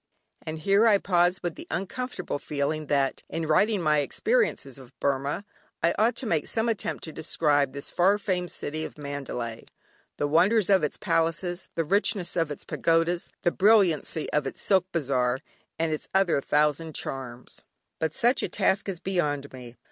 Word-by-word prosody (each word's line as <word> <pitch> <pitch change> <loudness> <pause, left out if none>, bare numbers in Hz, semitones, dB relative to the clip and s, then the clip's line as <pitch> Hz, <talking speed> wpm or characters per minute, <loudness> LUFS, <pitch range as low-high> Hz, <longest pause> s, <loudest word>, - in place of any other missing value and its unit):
And 155 0 -5
here 200 +7 +3
I 210 -3 +6
pause 175 -1 +2
with 175 -2 -2
the - - -10
uncomfortable 190 - -4
feeling 150 +1 -2
that 140 -2 +1
in 165 0 -3
writing 195 +5 +2
my 150 -1 +3
experiences 145 - 0
of 130 -2 -16
Burmah, 140 +7 -1 0.4
I 170 - +4
ought 225 +2 +3
to - - -5
make 165 -8 0
some 225 +1 -1
attempt 225 -3 -2
to 160 - -6
describe 150 -3 +1
this 140 0 -5
far 195 +4 +3
famed 185 -3 -2
city 155 +2 -4
of - - -7
Mandalay, 135 -5 -5 0.5
the 145 - 0
wonders 190 +7 +3
of 190 -4 +5
its 150 - -1
palaces, 170 +2 -1
the 165 - +1
richness 190 +1 +1
of 165 -3 +1
its 145 - -7
pagodas, 165 +1 +1
the 175 - +3
brilliancy 185 -7 +3
of 150 -2 +1
its - - -6
silk 190 -2 +2
bazaar, 130 -6 0 0.4
and 160 -1 0
its 155 - -5
other 185 -7 +3
thousand 150 +2 +1
charms. 125 -2 -5 0.4
But 160 -1 -1
such 245 +3 +3
a - - -1
task 200 0 +1
is 180 -4 -3
beyond 150 -8 -1
me. 125 -2 -10
165 Hz, 170 wpm, -26 LUFS, 145-190 Hz, 0.5 s, I